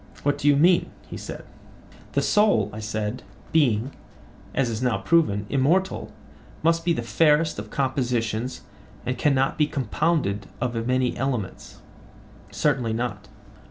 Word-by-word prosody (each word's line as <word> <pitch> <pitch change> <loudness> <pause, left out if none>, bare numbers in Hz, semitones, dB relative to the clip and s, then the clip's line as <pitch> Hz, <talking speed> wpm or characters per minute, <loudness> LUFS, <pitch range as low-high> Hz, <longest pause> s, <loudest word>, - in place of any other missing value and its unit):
What 145 0 +1
do 145 - 0
you 145 - +6
mean? 170 +5 +4 0.2
he - - -8
said. - - -7 0.7
The - - +1
soul, 115 - +3
I 110 - -6
said, 110 +2 -3 0.3
being, 130 -5 +2 0.6
as 135 -2 +1
is 115 0 -3
now 125 -6 +1
proven, 100 -3 +2
immortal, 155 - +1 0.5
must 165 +1 +3
be 170 - +1
the 135 -8 -1
fairest 150 +5 +2
of 105 +1 -7
compositions 125 -3 -1 0.4
and 125 - -1
cannot 135 +1 +1
be 150 - +4
compounded 135 - -1
of 120 -1 -1
many 125 -1 +1
elements? 125 -7 -4 0.7
Certainly 125 -6 0
not. 120 +2 -3
130 Hz, 135 wpm, -24 LUFS, 110-150 Hz, 0.7 s, you